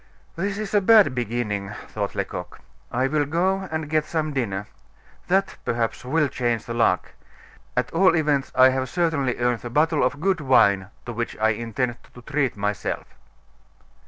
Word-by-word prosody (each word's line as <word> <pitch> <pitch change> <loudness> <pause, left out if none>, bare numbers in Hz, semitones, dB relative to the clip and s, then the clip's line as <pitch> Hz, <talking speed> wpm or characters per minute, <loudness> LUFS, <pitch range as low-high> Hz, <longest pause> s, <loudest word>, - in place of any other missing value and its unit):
"This 195 +3 -2
is 215 -1 -5
a 205 - +4
bad 210 - +6
beginning," 110 -5 -2 0.2
thought - - -3
Lecoq. - - -5 0.3
"I 130 +2 +1
will 145 +2 +1
go 190 +5 0
and 160 -1 -3
get 155 0 +1
some 155 -1 -2
dinner 105 -7 -2 0.6
that, 190 +2 +1
perhaps, 115 -1 -2
will 150 +4 +1
change 120 -4 -1
the 115 - -5
luck; 115 -6 +1 0.6
at - - 0
all 185 +1 +4
events, 150 -4 +1
I 130 0 +7
have 130 0 -1
certainly 160 -8 0
earned 120 -1 +1
the 120 - -7
bottle 155 +4 +2
of 135 +3 0
good 185 0 +1
wine 100 -8 +4 0.2
to 120 - -5
which 115 +1 -4
I 110 +1 +3
intend 115 +2 -2 0.2
to 125 - -11
treat 140 -4 -1
myself." 105 0 -3
130 Hz, 165 wpm, -24 LUFS, 120-160 Hz, 0.6 s, I